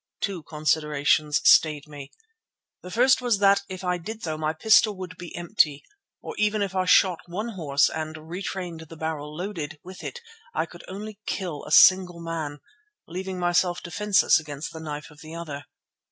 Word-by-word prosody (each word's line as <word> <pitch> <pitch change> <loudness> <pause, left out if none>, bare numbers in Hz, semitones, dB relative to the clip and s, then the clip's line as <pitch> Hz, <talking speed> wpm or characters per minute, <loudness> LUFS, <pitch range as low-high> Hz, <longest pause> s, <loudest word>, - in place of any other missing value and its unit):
Two 195 -4 -2
considerations 150 0 +1
stayed 150 -2 +5
me. 145 -2 -10 0.7
The 180 - -9
first 255 +7 +4
was 240 -4 +2
that 200 0 +4
if 185 0 -7
I 180 -1 0
did 220 +6 -7
so 155 -2 -2
my 155 0 -1
pistol 215 +5 +4
would 185 -1 -7
be 175 -1 -9
empty, 170 -5 +1 0.4
or - - -6
even 210 0 +2
if 195 -1 -4
I 185 -1 +1
shot 180 -1 +5
one 210 +7 -4
horse 150 -9 +2
and 155 0 -4
retained 180 -1 -5
a 160 0 -11
barrel 150 -2 -4
loaded, 170 -5 -5
with 185 +1 -11
it 480 - -6 0.4
I 160 - +1
could 175 +1 -14
only 205 +2 -7
kill 175 -7 -3
a - - -9
single 180 0 +6
man, 160 -4 -5 0.5
leaving 185 +2 -5
myself 175 0 +1
defenceless 205 +1 +3
against 150 +1 -7
the 160 - -7
knife 150 -2 -6
of 150 - -16
the 160 +1 -9
other. 145 -4 -6
170 Hz, 175 wpm, -25 LUFS, 155-190 Hz, 0.7 s, single